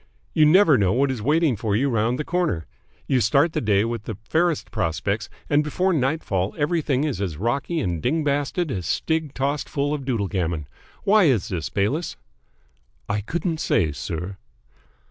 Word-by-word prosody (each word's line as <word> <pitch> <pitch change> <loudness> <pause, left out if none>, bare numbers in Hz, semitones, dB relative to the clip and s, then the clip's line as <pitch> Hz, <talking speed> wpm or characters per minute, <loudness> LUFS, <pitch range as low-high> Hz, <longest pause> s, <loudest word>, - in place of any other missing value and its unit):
You 155 -1 +5
never 160 - +6
know 95 -2 +2
what 135 +2 +2
is 125 -4 -4
waiting 150 +2 +2
for 105 -1 -1
you 135 +6 +2
round 115 0 +1
the 150 - -2
corner. 170 - -1 0.4
You 130 -2 +2
start 140 - +3
the - - -1
day 105 -1 +2
with 115 -2 -4
the 110 - -5
fairest 170 +1 +1
prospects, 80 -3 -1 0.2
and 145 +1 +3
before 180 +5 0
nightfall 130 - 0
everything 150 -3 +1
is 140 -11 -2
as 90 -7 -3
rocky 135 - -1
and 85 - -2
ding 155 +5 +1
basted 145 +3 0
as 90 -4 -3
stig 160 - -1
tossed 140 +2 -1
full 145 +1 -1
of 145 -2 -3
doodlegammon. 95 - -1 0.4
Why 210 -1 +5
is 125 - +2
this, 85 -5 -3
Bayliss?" 130 - -1 0.9
"I 105 0 -1
couldn't 165 - -2
say, 80 - +1
sir." 85 +7 -5
135 Hz, 170 wpm, -23 LUFS, 100-155 Hz, 0.9 s, never